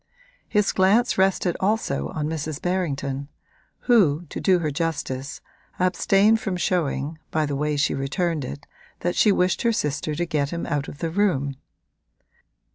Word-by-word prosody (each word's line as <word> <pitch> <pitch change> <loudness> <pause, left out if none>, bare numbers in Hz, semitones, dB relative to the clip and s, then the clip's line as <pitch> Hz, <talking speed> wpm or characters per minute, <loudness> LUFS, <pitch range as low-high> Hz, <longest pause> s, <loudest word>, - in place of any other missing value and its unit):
His 210 -2 +2
glance 205 +6 +3
rested 190 -2 +2
also 205 -8 0
on 150 -1 -3
Mrs. 155 -2 -3
Berrington, 140 -7 -2 0.5
who, 175 - +3
to - - -5
do 185 -1 +4
her 155 -3 -1
justice, 145 -3 -3 0.4
abstained 195 +4 +3
from 195 -4 -3
showing, 155 -4 -1
by 155 -1 0
the 145 -1 -2
way 150 +1 -1
she 145 0 +2
returned 155 +3 -1
it, 140 +2 -7 0.4
that 175 - -1
she 210 - +5
wished 180 -1 +1
her 235 - +3
sister 150 -6 -1
to 175 +3 -1
get 150 -4 -1
him 170 +1 -4
out 145 -1 -2
of - - -9
the 165 - -2
room. 160 -8 +1
165 Hz, 155 wpm, -24 LUFS, 145-190 Hz, 0.5 s, she